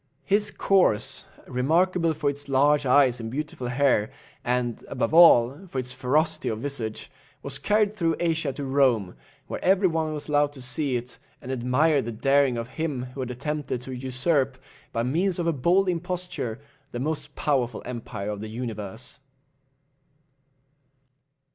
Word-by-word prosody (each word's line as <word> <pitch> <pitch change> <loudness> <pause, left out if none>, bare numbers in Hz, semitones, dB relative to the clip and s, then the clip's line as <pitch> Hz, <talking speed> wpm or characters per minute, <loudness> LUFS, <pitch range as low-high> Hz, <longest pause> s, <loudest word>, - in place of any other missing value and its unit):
His 210 +1 +3
corse, 190 - +1 0.2
remarkable 165 +6 +1
for 150 -1 -2
its 140 0 -2
large 140 +1 +3
eyes 125 -2 +4
and 115 -1 -5
beautiful 135 -1 -4
hair, 125 -4 +2 0.3
and, 120 -1 -1
above 115 - -2
all, 155 0 +6
for 135 - -7
its 125 -1 -2
ferocity 155 +6 0
of 110 - -2
visage, 120 -5 -4 0.3
was 140 -1 -4
carried 210 0 +2
through 165 -6 0
Asia 165 -4 0
to 145 - -6
Rome, 130 -9 +2 0.3
where - - -6
every 190 +1 +4
one 160 -2 -1
was 150 -1 -5
allowed 145 -1 +2
to 140 - -12
see 125 +2 -1
it, 120 +1 -5 0.2
and 130 - -7
admire 130 +4 +2
the 120 - -5
daring 135 +2 +2
of 115 0 -4
him 150 -4 -3
who 140 - -9
had 130 -1 -3
attempted 135 0 -3
to 130 - -8
usurp, 130 +1 0 0.3
by 115 - -1
means 170 +9 0
of 175 - -1
a 170 - +2
bold 175 +8 +2
imposture, 175 -9 -3 0.3
the 120 - -4
most 155 +4 -3
powerful 125 -6 0
empire 115 -4 -5
of 105 -1 -6
the 110 - -6
universe. 115 +3 -6
140 Hz, 155 wpm, -25 LUFS, 125-160 Hz, 0.3 s, all